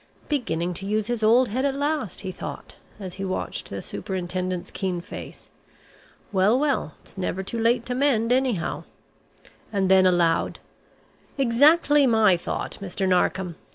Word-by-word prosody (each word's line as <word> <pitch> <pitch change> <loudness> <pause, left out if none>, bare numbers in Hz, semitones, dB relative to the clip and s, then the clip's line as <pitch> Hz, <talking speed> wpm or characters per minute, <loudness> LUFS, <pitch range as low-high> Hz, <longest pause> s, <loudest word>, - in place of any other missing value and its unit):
"Beginning 180 - -1
to 195 +3 -6
use 215 +1 0
his 240 0 -2
old 235 +4 +4
head 255 +6 -1
at 275 -1 +1
last!" 285 - -2
he 190 - -4
thought - - -8 0.2
as 185 -3 -6
he 195 - -6
watched 185 -1 -3
the - - -6
Superintendent's 185 -1 -4
keen 185 -3 -2
face. 170 - -10 0.8
"Well, 200 +4 +3
well, 275 - 0
it's 195 - -11
never 190 +1 -2
too 230 +4 -4
late 235 +1 +2
to 250 - -2
mend, 245 -4 +2
anyhow." 250 -8 0 0.9
And 195 -3 +1
then 190 -1 +6
aloud, 170 -2 +2 0.8
"Exactly 285 +3 +5
my 220 -5 +5
thought, 170 - -4
Mr. 195 0 -2
Narkom. 180 -1 +1
205 Hz, 150 wpm, -24 LUFS, 185-250 Hz, 0.9 s, then